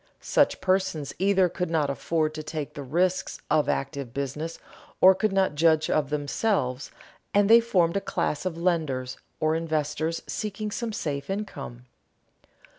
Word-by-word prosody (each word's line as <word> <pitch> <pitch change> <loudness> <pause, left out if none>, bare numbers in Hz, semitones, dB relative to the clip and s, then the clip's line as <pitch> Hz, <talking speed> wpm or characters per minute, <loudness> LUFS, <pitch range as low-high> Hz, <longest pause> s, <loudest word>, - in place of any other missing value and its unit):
Such - - +2
persons 185 -6 0
either 190 -1 +4
could 180 0 -3
not 155 -4 +1
afford 155 +2 -1
to 155 - -5
take 155 -1 -5
the 145 - -7
risks 180 +7 0
of 150 - +3
active 135 -3 -3
business, 145 +4 -3 0.4
or 190 +1 +8
could 195 +2 0
not 195 -5 +2
judge 155 0 +3
of 145 -3 +1
them, 150 -1 -2 1.1
and 205 0 +5
they 230 +2 +8
formed 185 -7 +2
a - - -1
class 150 - -2
of 180 -3 -3
lenders 155 -8 -1 0.2
or 155 0 +2
investors 160 0 -1
seeking 210 0 -4
some 235 +1 -3
safe 140 -7 -4
income. 195 - -5
165 Hz, 150 wpm, -26 LUFS, 150-190 Hz, 1.1 s, or